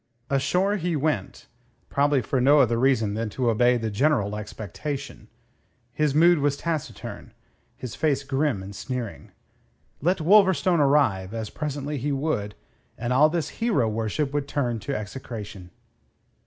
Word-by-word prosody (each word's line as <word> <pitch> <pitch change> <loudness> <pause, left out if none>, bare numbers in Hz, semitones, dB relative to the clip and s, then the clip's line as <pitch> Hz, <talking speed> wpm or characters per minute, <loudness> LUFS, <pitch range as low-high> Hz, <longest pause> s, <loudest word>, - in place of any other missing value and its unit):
Ashore 180 +9 +1
he 175 -2 -1
went, 145 -9 -2 0.4
probably 140 -2 +2
for 130 - 0
no 145 +4 +6
other 120 -3 +3
reason 120 -5 +2
than 110 +1 -2
to 120 +2 0
obey 120 +2 +3
the 110 -2 -3
general 105 -3 +1
expectation. 110 - -6 0.7
His 150 0 0
mood 170 +1 +5
was 140 0 +1
taciturn; 160 -2 -5 0.4
his 125 -4 -7
face 140 -3 0
grim 135 -6 -1
and 100 +1 -9
sneering. 125 0 -6 0.7
Let 180 +6 +2
Wolverstone 185 0 +4
arrive, 115 -9 +2
as 110 -2 -4
presently 145 -1 -4
he 145 +4 -2
would, 135 -8 -2 0.4
and 120 +1 -2
all 150 +4 +5
this 165 -1 -2
hero 160 - +2
worship 115 +6 -2
would 145 -1 -1
turn 125 -6 -1
to 140 +7 -4
execration. 105 -3 -7
135 Hz, 140 wpm, -25 LUFS, 110-150 Hz, 0.7 s, no